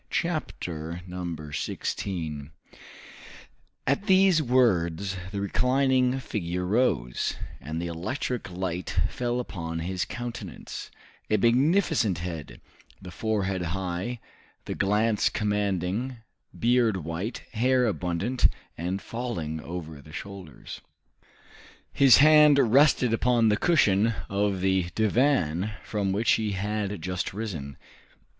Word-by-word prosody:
Chapter 85 - -3 0.5
16 75 +1 -3 1.3
At 140 +10 0
these 190 -4 +5
words 100 - +2 0.2
the 100 - -3
reclining 130 +4 +2
figure 90 -7 -3
rose, 90 - +1 0.2
and 80 +2 -5
the 85 - -3
electric 100 +7 -3
light 90 -1 -4
fell 120 0 -1
upon 85 -8 -5
his 90 +2 -2
countenance; 120 0 -7 0.4
a 110 - +3
magnificent 120 - +3
head, 85 -3 -6 0.4
the 90 -2 -10
forehead 95 -1 -1 0.2
high, 95 +6 -3 0.5
the - - -3
glance 105 +2 +2
commanding, 105 +3 -1 0.4
beard 120 -3 +3
white, 85 +8 -4
hair 125 +2 +3
abundant 100 +4 +1 0.3
and 90 +4 -3
falling 85 -11 -4
over 80 -3 -7
the 75 - -15
shoulders. 95 -4 -9 1.1
His 135 -3 +7
hand 150 0 +7
rested 130 -1 +4
upon 120 -1 +3
the 105 - +3
cushion 110 - +3
of 100 -1 0
the 95 -2 +1
divan 110 - +2
from 100 -3 -1
which 105 +4 +2
he 110 -2 +1
had 105 0 -2
just 90 +1 -3
risen. 80 - -5
105 Hz, 105 wpm, -27 LUFS, 90-125 Hz, 1.3 s, His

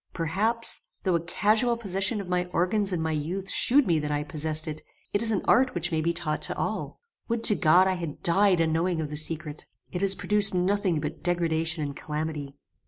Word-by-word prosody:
Perhaps, 210 +8 +1 0.2
though 185 - +1
a 170 - +2
casual 215 +7 +1
position 195 0 0
of 195 - -6
my 180 0 0
organs 185 +3 0
in 170 -3 -2
my 160 - -1
youth 175 +6 -3
shewed 275 +2 +4
me 165 -5 +1
that 150 0 -4
I 145 0 -1
possessed 155 0 -2
it, 155 0 -5 0.3
it 205 - +1
is 230 - +2
an 210 -4 0
art 255 -2 +3
which 175 +1 -1
may 160 -1 0
be 170 +2 0
taught 170 -3 -3
to - - -1
all. - - -4 0.3
Would 230 -1 -2
to 210 - +4
God 180 +2 +4
I 190 - +1
had 170 -5 -6
died 190 +1 +4
unknowing 165 +1 0
of 150 -2 -4
the - - -4
secret! 155 -1 -2 0.2
It 180 - -3
has 195 0 +4
produced 205 -2 +3
nothing 185 -2 +1
but - - -5
degradation 165 -2 0
and 140 -1 -5
calamity. 150 -2 -5
175 Hz, 210 wpm, -26 LUFS, 160-200 Hz, 0.3 s, shewed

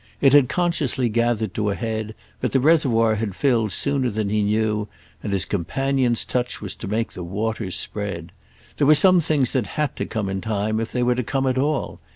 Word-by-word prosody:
It 135 -1 +4
had 145 -4 +6
consciously 155 -8 0
gathered 115 -2 0
to 105 -1 -1
a 100 - -1
head, 110 -2 -4 0.2
but - - -2
the 135 - +4
reservoir 125 -7 +3
had 105 -3 -3
filled 115 -6 +1
sooner 140 +3 0
than 105 -2 -2
he 105 +1 +1
knew, 105 0 0 0.3
and - - -4
his 95 -2 +1
companion's 125 - 0
touch 125 -1 -2
was 100 -3 -5
to - - -7
make 110 +3 -1
the 90 - -6
waters 105 +2 -3
spread. 100 -6 -4 0.5
There 145 - +2
were 155 - +7
some 185 +3 +5
things 145 -5 +1
that 125 -6 0
had 150 -1 0
to - - -3
come 110 -4 -3
in 95 0 -3
time 110 0 -1
if 115 0 -3
they 125 - 0
were 125 0 +3
to 125 - -1
come 135 +3 -1
at 130 0 +1
all. 145 -1 -1
115 Hz, 210 wpm, -22 LUFS, 105-135 Hz, 0.5 s, were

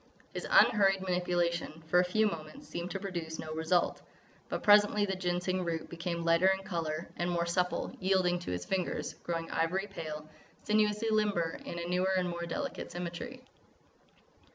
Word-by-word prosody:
His - - -4
unhurried 195 -4 +5
manipulation, 175 -3 -1
for 175 +3 +4
a - - +5
few 215 +5 +2
moments, 155 -6 -5
seemed 170 +1 -4
to 195 - -3
produce 170 -5 -4
no 155 0 -5
result. 160 +3 +1 0.5
But - - -3
presently 205 0 +6
the 195 -1 -2
Ginseng 185 0 -1
root 165 -2 -3
became 170 0 -3
lighter 170 +2 +4
in 190 0 +2
colour 165 -3 -3
and 175 +1 0
more 170 -1 +1
supple, 180 +1 -1
yielding 185 -2 +2
to 175 - -5
his 90 0 -3
fingers, 185 -2 -2
growing 165 -1 -3
ivory 180 +5 0
pale, 155 -6 -6 0.4
sinuously 215 +1 +2
limber 205 -6 +1
in 170 - -5
a 170 - -3
newer 180 +2 +1
and 180 -1 +1
more 170 0 -4
delicate 165 - -4
symmetry. 175 +9 -6
175 Hz, 165 wpm, -32 LUFS, 170-190 Hz, 0.5 s, presently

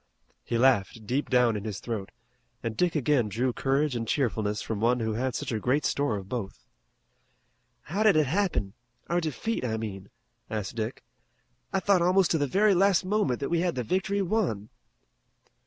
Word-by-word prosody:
He 115 - -1
laughed 115 -3 +2
deep 130 +7 -1
down 125 -3 +3
in 105 - -4
his 105 -3 -4
throat 110 -5 -4 0.5
and 115 -1 -3
Dick 180 +3 +1
again 135 -6 +2
drew 120 +5 0
courage 135 +2 0
and 115 -1 -3
cheerfulness 110 -6 0
from 110 -2 -4
one 120 +2 +3
who 110 -1 -1
had 125 +2 -2
such - - -3
a 110 - -1
great 130 +7 +1
store 140 -7 0
of 95 -1 -8
both. 110 -4 -5 1.2
"How 190 +10 -3
did 215 -4 +5
it 155 -1 +4
happen? 145 - 0 0.4
Our 175 +1 +1
defeat, 165 - -2
I 110 -3 -1
mean," 100 -3 -6 0.4
asked 105 -4 -3
Dick. 115 +2 -4 0.7
"I 195 - +1
thought 190 -1 +3
almost 180 +1 +3
to 160 - +2
the 145 - +1
very 200 +8 +4
last 190 0 +3
moment 185 - 0
that 140 - -2
we 170 - +1
had 175 0 0
the 125 - -2
victory 195 - 0
won." 170 - -1
130 Hz, 185 wpm, -27 LUFS, 110-175 Hz, 1.2 s, did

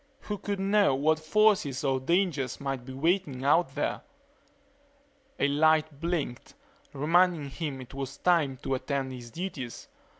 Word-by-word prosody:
Who 210 -1 -5
could 200 0 -3
know 195 -6 +3
what 155 +3 +2
forces 155 -5 +2
or 135 -2 +1
dangers 155 -3 0
might 135 -3 -4
be 130 - -8
waiting 150 -2 0
out 145 -1 +3
there? 145 - -1 1.4
A - - +3
light 155 0 +2
blinked, 165 -8 -3 0.4
reminding 160 0 +2
him 145 -3 -4
it 125 - -12
was 135 0 -5
time 160 -7 +2
to - - -1
attend 135 0 -2
to - - -6
his 120 -1 -10
duties. 150 -6 -6
145 Hz, 145 wpm, -28 LUFS, 135-175 Hz, 1.4 s, know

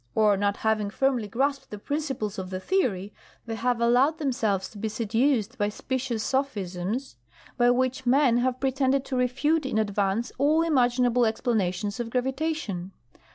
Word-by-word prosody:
Or 210 -2 +4
not 200 +1 0
having 215 -2 0
firmly 250 -1 0
grasped 270 +4 -1
the 210 - -7
principles 265 -5 -3
of 185 -1 -5
the 185 0 -4
theory, 205 - -1 0.3
they 230 - -4
have 235 +2 0
allowed 250 +7 +3
themselves 235 - 0
to 210 - -12
be 220 +1 -2
seduced 230 +2 0
by 205 0 +1
specious 245 0 -3
sophisms, 215 - -2 0.4
by 240 0 +4
which 255 +1 0
men 255 -2 +4
have 250 +1 0
pretended 270 0 +1
to 265 - -4
refute 275 +6 +1
in 265 -5 -2
advance 205 +1 0
all 305 +4 +3
imaginable 245 -5 +3
explanations 205 -3 -1
of 235 -1 -3
gravitation. 255 - -2
245 Hz, 155 wpm, -26 LUFS, 210-265 Hz, 0.4 s, Or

